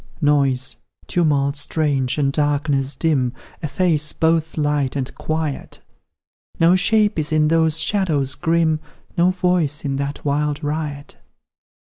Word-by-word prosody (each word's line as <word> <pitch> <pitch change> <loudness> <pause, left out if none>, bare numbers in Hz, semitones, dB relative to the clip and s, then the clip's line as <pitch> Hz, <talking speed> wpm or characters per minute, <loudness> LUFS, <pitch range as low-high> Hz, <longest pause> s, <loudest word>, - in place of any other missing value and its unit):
Noise, 135 -3 +1 0.3
tumult 145 -5 +1
strange, 140 -3 -1
and 140 -2 +1
darkness 145 -2 0
dim, 135 -7 0 0.3
Efface 155 -1 0
both 160 0 0
light 145 -3 0
and 130 -2 -3
quiet; 155 -3 -4 0.8
No 170 +2 +5
shape 210 -1 +2
is 155 +1 -2
in 155 -1 +3
those 160 -1 +2
shadows 155 -10 +1
grim, 160 +1 +1 0.4
No 175 0 +3
voice 180 -5 0
in 135 -1 -1
that 140 +1 -4
wild 150 +1 -1
riot. 145 -1 -4
150 Hz, 120 wpm, -20 LUFS, 140-160 Hz, 0.8 s, No